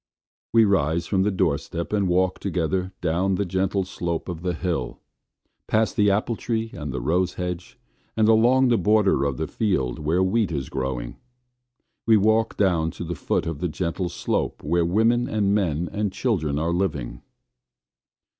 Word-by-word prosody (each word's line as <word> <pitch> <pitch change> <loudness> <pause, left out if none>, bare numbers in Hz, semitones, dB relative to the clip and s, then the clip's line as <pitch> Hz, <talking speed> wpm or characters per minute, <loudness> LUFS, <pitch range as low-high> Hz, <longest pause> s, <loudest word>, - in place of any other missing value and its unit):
We 115 -1 +5
rise 85 -4 +1
from 95 -2 +1
the 100 - +2
door 85 -7 +1
step 85 +4 -6
and 100 -2 +2
walk 90 +1 +1
together 95 0 -1
down 90 +3 +1
the 100 - -1
gentle 95 +2 0
slope 85 -2 -4
of 85 -2 -5
the 90 -1 -2
hill; 80 -8 -3 0.7
past 110 0 +1
the 105 -1 +4
apple 105 +4 +1
tree, 115 0 -3
and 75 -2 -5
the 65 - -3
rose 90 +8 0
hedge; 90 0 -5 0.4
and 110 -1 +4
along 120 +4 +4
the 120 - +3
border 105 -9 +3
of 70 -3 -1
the - - -1
field 80 - -1
where 80 +5 +1
wheat 100 0 +1
is 70 -5 -3
growing. 65 -2 -4 0.9
We 110 -1 +6
walk 110 +2 +2
down 85 -5 +2
to - - -4
the 85 +1 -4
foot 70 - -1
of 80 -3 -4
the 90 - -1
gentle 90 +2 -2
slope - - -2
where 85 +4 +1
women 115 +7 +2
and 100 -4 +1
men 90 -5 0
and 105 -1 -1
children 85 - -1
are 80 +3 0
living. 80 -9 -2
90 Hz, 175 wpm, -24 LUFS, 80-105 Hz, 0.9 s, We